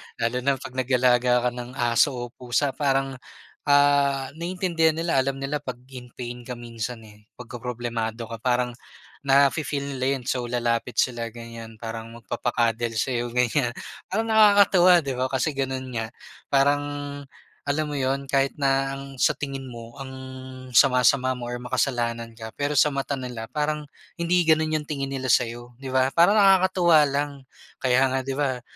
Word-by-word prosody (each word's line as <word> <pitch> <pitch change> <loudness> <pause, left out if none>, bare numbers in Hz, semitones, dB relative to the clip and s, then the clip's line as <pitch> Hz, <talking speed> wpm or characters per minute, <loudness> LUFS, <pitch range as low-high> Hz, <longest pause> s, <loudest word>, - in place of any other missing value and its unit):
Lalo 115 +2 -1
na 140 +2 +1
pag 130 -1 -9
nag-alaga 125 -1 +2
ka 125 - +2
ng 125 +1 -8
aso 120 +3 +2
o 120 0 -4
pusa 125 +3 -1
parang, 135 -2 -1 0.5
ah, 140 -1 +3
naiintindihan 170 -3 +1
nila 165 -4 +1
alam 135 +1 0
nila 135 +2 -3
pag 130 -4 -6 0.2
in 125 -1 -9
pain 120 -1 -7
ka 125 - -4
minsan 115 0 -6
eh. 105 0 -17
Pagka-problemado 120 -2 -5
ka 115 - -6
parang 125 +1 +1 0.6
na 140 0 +6
fi-feel 140 -2 -3
nila 130 - 0
yun 130 - -7
so 125 -1 -2
lalapit 120 0 -1
sila 120 -2 -1
ganyan 115 -1 -9
parang 115 0 -6
magpapa-cuddle 120 0 -1
sa'yo 120 +1 -1
ganyan 125 0 +1 0.3
parang 220 +4 -1
nakakatuwa, 200 -4 +6
di 140 - -3
ba? 130 - +1
Kasi 130 +4 0
ganun 130 -2 -3
nga 115 -2 -3 0.4
parang, 140 +1 +3 0.8
alam 150 +2 -1
mo 145 - -3
yun, 135 +1 -1
kahit 135 -1 +2
na 135 0 +2
ang 135 0 -8
sa - - +3
tingin 135 -2 -5
mo 120 0 -10
ang 135 -1 -8 0.6
sama-sama 130 0 +4
mo 120 -1 -6
or 120 - -3
makasalanan 120 -2 -2
ka 110 -1 -8
pero 145 0 -1
sa 150 0 +4
mata 140 +1 -2
nila 125 -3 -6
parang 150 0 -2 0.3
hindi 175 0 +2
ganun 160 -1 +3
yung 150 - -6
tingin 140 -2 -3
nila 135 -1 -4
sayo 120 +1 -1
di 135 - -6
ba? 130 +1 +2
Parang 175 +6 +5
nakakatuwa 185 -5 +5
lang. 145 +1 -1 0.5
Kaya 130 +1 +4
nga 135 - +1
di 135 +1 -4
ba, 130 -4 -1
130 Hz, 165 wpm, -24 LUFS, 120-140 Hz, 0.8 s, na